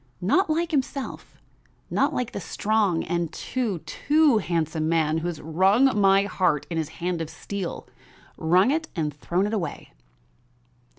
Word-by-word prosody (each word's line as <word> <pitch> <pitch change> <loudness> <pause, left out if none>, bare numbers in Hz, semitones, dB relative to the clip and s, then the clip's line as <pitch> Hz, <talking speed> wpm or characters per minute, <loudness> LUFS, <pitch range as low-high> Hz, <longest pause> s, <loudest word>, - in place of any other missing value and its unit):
Not 315 - +2
like 330 +2 0
himself, 275 -2 -3 0.5
not - - +2
like 245 -2 -2
the - - -5
strong 205 -1 0
and 170 -1 -2
too, 235 -8 -2
too 290 - +3
handsome 160 -4 -1
man 160 -1 +2
who 165 - -3
has 170 -3 -4
wrung 195 - +3
my 195 0 +5
heart 180 -7 0
in 165 - -1
his 155 - -3 0.2
hand 180 -2 -1
of 160 - -4
steel, 185 +3 -6 0.5
wrung 180 +9 +3
it 315 +1 -1
and 155 -4 -1
thrown 170 +8 -1
it 210 - -2
away." 175 -9 -4
185 Hz, 155 wpm, -25 LUFS, 165-225 Hz, 0.5 s, my